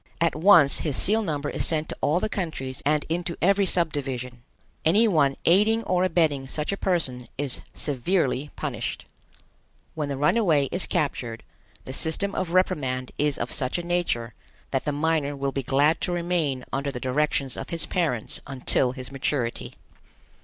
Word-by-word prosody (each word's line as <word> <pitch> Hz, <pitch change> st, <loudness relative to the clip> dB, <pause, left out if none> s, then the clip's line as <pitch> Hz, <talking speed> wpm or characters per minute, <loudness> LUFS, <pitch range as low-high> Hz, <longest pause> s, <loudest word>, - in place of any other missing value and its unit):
At 170 Hz, -1 st, +2 dB
once 165 Hz, -4 st, +6 dB
his 145 Hz, -5 st, -2 dB
seal 220 Hz, +3 st, +3 dB
number 150 Hz, -7 st, -2 dB
is -, -, -2 dB
sent 155 Hz, -1 st, -1 dB
to -, -, -5 dB
all 155 Hz, +4 st, +2 dB
the 215 Hz, -, -1 dB
countries 155 Hz, -10 st, -4 dB
and 150 Hz, 0 st, +2 dB
into 170 Hz, +1 st, -2 dB
every 195 Hz, +2 st, +3 dB
sub 170 Hz, -3 st, +1 dB
division. 125 Hz, -3 st, -4 dB, 0.4 s
Any 205 Hz, +8 st, +4 dB
one 145 Hz, -8 st, +3 dB
aiding 215 Hz, +6 st, +4 dB
or 180 Hz, -3 st, +1 dB
abetting 160 Hz, -7 st, +1 dB
such 150 Hz, +4 st, -2 dB
a -, -, 0 dB
person 145 Hz, -11 st, -1 dB
is 140 Hz, -2 st, +1 dB
severely 145 Hz, 0 st, 0 dB
punished. 120 Hz, -7 st, -4 dB, 0.9 s
When 150 Hz, -2 st, -3 dB
the 140 Hz, -, -3 dB
runaway 150 Hz, -, +3 dB
is 180 Hz, -, -1 dB
captured, 120 Hz, -6 st, -2 dB, 0.4 s
the 130 Hz, -, -6 dB
system 165 Hz, +8 st, -1 dB
of 185 Hz, -, -2 dB
reprimand 130 Hz, -8 st, 0 dB
is 145 Hz, -1 st, +1 dB
of 120 Hz, -, -3 dB
such 130 Hz, +1 st, 0 dB
a 175 Hz, -, -3 dB
nature 170 Hz, -10 st, -1 dB, 0.4 s
that 135 Hz, -, -1 dB
the 150 Hz, -, +1 dB
minor 145 Hz, -1 st, 0 dB
will 140 Hz, 0 st, -2 dB
be 135 Hz, -, -2 dB
glad 140 Hz, +5 st, +2 dB
to -, -, -1 dB
remain 170 Hz, -7 st, -1 dB
under 140 Hz, +1 st, -1 dB
the 125 Hz, -, -5 dB
directions 135 Hz, 0 st, 0 dB
of -, -, -6 dB
his 165 Hz, -1 st, -1 dB
parents 155 Hz, -, -1 dB
until 130 Hz, -1 st, 0 dB
his 130 Hz, 0 st, -7 dB
maturity. 135 Hz, -3 st, -2 dB
150 Hz, 170 wpm, -25 LUFS, 135-175 Hz, 0.9 s, once